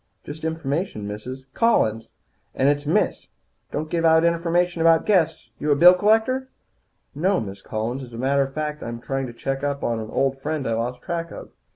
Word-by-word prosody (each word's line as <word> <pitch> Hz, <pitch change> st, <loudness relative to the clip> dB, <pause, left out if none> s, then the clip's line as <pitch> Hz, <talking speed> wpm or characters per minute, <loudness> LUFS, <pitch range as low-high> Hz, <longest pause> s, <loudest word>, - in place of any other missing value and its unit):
"Just 155 Hz, +2 st, -9 dB
information, 160 Hz, -, -2 dB
Mrs. 125 Hz, +6 st, -7 dB
" -, -, -46 dB
"Collins, 115 Hz, -, +2 dB, 0.5 s
and 135 Hz, -, +2 dB
it's 145 Hz, 0 st, +1 dB
Miss. 195 Hz, +8 st, +1 dB, 0.4 s
Don't 155 Hz, +2 st, -3 dB
give 170 Hz, -1 st, 0 dB
out 160 Hz, 0 st, +5 dB
information 170 Hz, +1 st, +1 dB
about 165 Hz, 0 st, +4 dB
guests. 165 Hz, -6 st, +1 dB
You 150 Hz, -, -2 dB
a 145 Hz, -, +5 dB
bill 175 Hz, +5 st, +8 dB
collector?" 225 Hz, +7 st, +2 dB, 0.6 s
"No, 185 Hz, +7 st, +1 dB
Miss 100 Hz, -2 st, -7 dB
Collins. 115 Hz, +6 st, -3 dB
As 125 Hz, -2 st, -10 dB
a -, -, -7 dB
matter 135 Hz, +3 st, +2 dB
of 135 Hz, 0 st, -1 dB
fact, 150 Hz, +1 st, -4 dB
I'm 115 Hz, 0 st, -5 dB
trying 135 Hz, +2 st, -3 dB
to 120 Hz, -, -9 dB
check 135 Hz, +3 st, -3 dB
up 140 Hz, -1 st, -2 dB
on 115 Hz, -1 st, 0 dB
an 110 Hz, -1 st, -6 dB
old 135 Hz, +1 st, 0 dB
friend 150 Hz, -1 st, -2 dB
I 115 Hz, -, 0 dB
lost 120 Hz, +2 st, -3 dB
track 170 Hz, -1 st, -3 dB
of. -, -, -10 dB
145 Hz, 200 wpm, -23 LUFS, 130-170 Hz, 0.6 s, bill